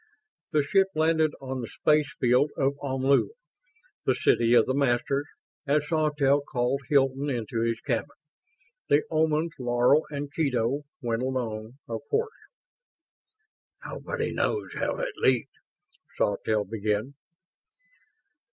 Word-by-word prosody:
The 150 -1 +3
ship 195 +6 +3
landed 160 -1 +2
on 130 -1 -4
the 115 - -5
spacefield 145 -3 +2
of 135 0 +2
Omlu, 135 0 +2 0.7
the - - +2
City 120 +1 +3
of 115 - +6
the 130 - 0
Masters, 140 +1 +1 0.4
and 145 +1 +3
Sawtelle 150 -2 +2
called 130 0 -1
Hilton 135 0 +2
into 115 -3 -2
his 115 0 0
cabin. 125 +1 -1 0.8
The 145 - +4
Omans 160 +1 +1
Laro 125 +4 +3
and 145 -1 -5
Kedo 135 -2 0 0.2
went 115 0 -1
along, 120 -2 -3
of 115 -1 -4
course. 450 0 0 1.5
"Nobody - - -4
knows 430 - -1
how - - -2
it - - -3
leaked 130 -3 +1 0.4
..." - - -30
Sawtelle 105 +1 0
began. 105 +4 -2
135 Hz, 120 wpm, -27 LUFS, 120-150 Hz, 1.5 s, of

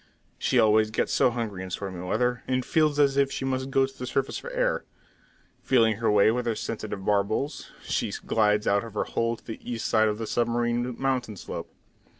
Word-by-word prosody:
She - - +1
always 110 0 +4
gets 110 - -1
so - - +4
hungry 115 -6 -4
in 95 - -6
stormy 95 -1 -5
weather, 125 +6 0
and 130 -1 0
feels 155 -3 +2
as 140 -2 +3
if 140 -1 +3
she 135 - -3
must 130 0 -1
go 135 0 +3
to 135 0 -12
the 125 - -4
surface 135 +1 -1
for - - -8
air. - - 0 0.8
Feeling 115 -5 +3
her 115 0 +1
way 105 +1 +5
with 125 +1 -2
her 115 - +1
sensitive 105 -3 -5
barbels, 105 +8 0
she - - -1
glides 105 -1 +1
out 100 0 +2
of 115 -2 -10
her - - +1
hole 115 0 -1
on - - -7
the 110 - -7
east 120 -2 -4
side 110 -1 +3
of 105 0 -1
the 115 - -4
submarine 120 +1 0
mountain 130 -6 -1
slope. - - -6
115 Hz, 205 wpm, -26 LUFS, 105-130 Hz, 0.8 s, way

